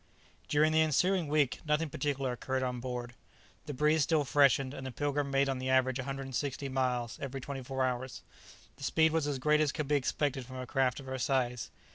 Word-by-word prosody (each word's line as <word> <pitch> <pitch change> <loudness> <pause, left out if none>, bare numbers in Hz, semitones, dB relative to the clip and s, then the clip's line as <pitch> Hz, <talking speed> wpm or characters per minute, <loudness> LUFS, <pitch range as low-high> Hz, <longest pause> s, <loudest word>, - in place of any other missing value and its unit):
During 150 +1 +3
the 160 0 +4
ensuing 170 +3 +2
week 145 -3 +1
nothing 150 +1 +1
particular 135 -3 -1
occurred 130 +2 -2
on 125 -1 -2
board. 120 -1 -5 0.5
The 145 - -4
breeze 150 +3 +3
still 155 +1 +2
freshened, 140 -1 +3
and 135 - -7
the - - -5
"Pilgrim" 145 +1 -1
made 135 0 +2
on 135 -1 -1
the 130 0 -3
average 130 0 +2
160 135 +1 -3
miles 125 -3 -1
every 135 -1 -4
twenty 135 +1 -6
four 130 +1 -1
hours. 125 0 -3 0.5
The 140 - -11
speed 160 +3 +3
was 160 -2 0
as 145 -2 -1
great 150 +3 +3
as 150 -2 +2
could 150 -3 -3
be 150 - 0
expected 135 -2 0
from 130 - -9
a 130 - -5
craft 130 0 +1
of 140 - -10
her 130 0 -4
size. 125 -3 0
135 Hz, 205 wpm, -31 LUFS, 130-145 Hz, 0.5 s, the